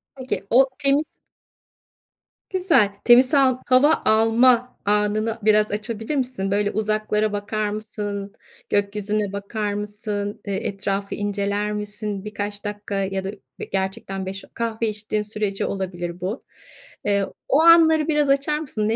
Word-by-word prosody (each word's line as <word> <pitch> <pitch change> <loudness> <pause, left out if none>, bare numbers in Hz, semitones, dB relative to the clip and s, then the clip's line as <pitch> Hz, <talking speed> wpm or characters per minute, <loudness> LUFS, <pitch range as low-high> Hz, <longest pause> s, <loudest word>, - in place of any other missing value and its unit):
Peki, 255 -6 -4
o 260 +3 +6
temiz 280 +2 +3 1.5
Güzel. 340 - +3 0.2
Temiz 250 +1 +8
sal 270 -4 +4
hava 280 +5 +4
alma 235 +3 +4
anını 210 +2 +1
biraz 215 0 +3
açabilir 220 +6 -3
misin? 250 -7 -1
Böyle, 205 0 +1
uzaklara 215 0 0
bakar 205 +1 -2
mısın? 205 -1 -4 0.4
Gökyüzüne 205 0 -1
bakar 205 +1 -3
mısın? 205 0 -4
Eee, 195 -1 -2
etrafı 200 0 -3
inceler 205 0 -1
misin? 210 -1 -4
Birkaç 205 0 -4
dakika 205 -1 -5
ya 195 -1 -1
da, 195 - -3
ı 205 -1 -11
gerçekten 190 0 -3
beş 195 +1 -6
o - - -23
kahve 230 -1 -2
içtiğin 215 0 -2
sürece 210 -2 -2
olabilir 175 -2 -4
bu. 200 +8 -4 0.6
Eee, 200 -1 +2 0.2
o 290 +4 +4
anları 320 -2 +6
biraz 295 -2 +2
açar 280 +2 +2
mısın? 220 -8 -2
Ne 225 - +1
210 Hz, 135 wpm, -22 LUFS, 200-235 Hz, 1.5 s, Temiz